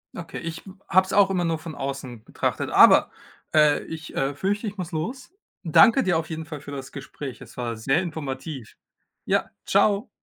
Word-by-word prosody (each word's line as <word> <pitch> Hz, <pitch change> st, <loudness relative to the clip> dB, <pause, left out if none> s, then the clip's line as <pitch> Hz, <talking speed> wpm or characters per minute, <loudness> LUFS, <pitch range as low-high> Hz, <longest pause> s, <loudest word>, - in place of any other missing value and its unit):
Okay, 170 Hz, -2 st, -7 dB
ich, 165 Hz, -1 st, -6 dB
hm, 190 Hz, 0 st, -13 dB
habe 185 Hz, +2 st, +4 dB
es 190 Hz, -, -8 dB
auch 200 Hz, -1 st, +5 dB
immer 185 Hz, -2 st, 0 dB
nur 165 Hz, -2 st, -1 dB
von 160 Hz, -1 st, -8 dB
außen 135 Hz, -4 st, -6 dB
betrachtet, -, -, -2 dB
aber, -, -, +7 dB, 0.4 s
äh, 150 Hz, -1 st, +4 dB
ich, 160 Hz, -1 st, -8 dB
äh, 135 Hz, +1 st, 0 dB
fürchte, 205 Hz, -, -2 dB
ich 205 Hz, 0 st, -6 dB
muss 180 Hz, -2 st, -5 dB
los. 245 Hz, -, -4 dB, 0.3 s
Danke 230 Hz, -, +6 dB
dir 175 Hz, -3 st, +2 dB
auf 160 Hz, -1 st, -4 dB
jeden 160 Hz, -1 st, -5 dB
Fall 150 Hz, -2 st, -8 dB
für 145 Hz, -, -10 dB
das 135 Hz, -1 st, -7 dB
Gespräch. 135 Hz, -1 st, -8 dB
Es -, -, -13 dB
war 120 Hz, -2 st, -3 dB
sehr 135 Hz, +9 st, +1 dB
informativ. 145 Hz, -6 st, -6 dB, 0.5 s
Ja, -, -, +1 dB, 0.2 s
tschau. 200 Hz, +3 st, +2 dB
160 Hz, 195 wpm, -24 LUFS, 140-190 Hz, 0.5 s, aber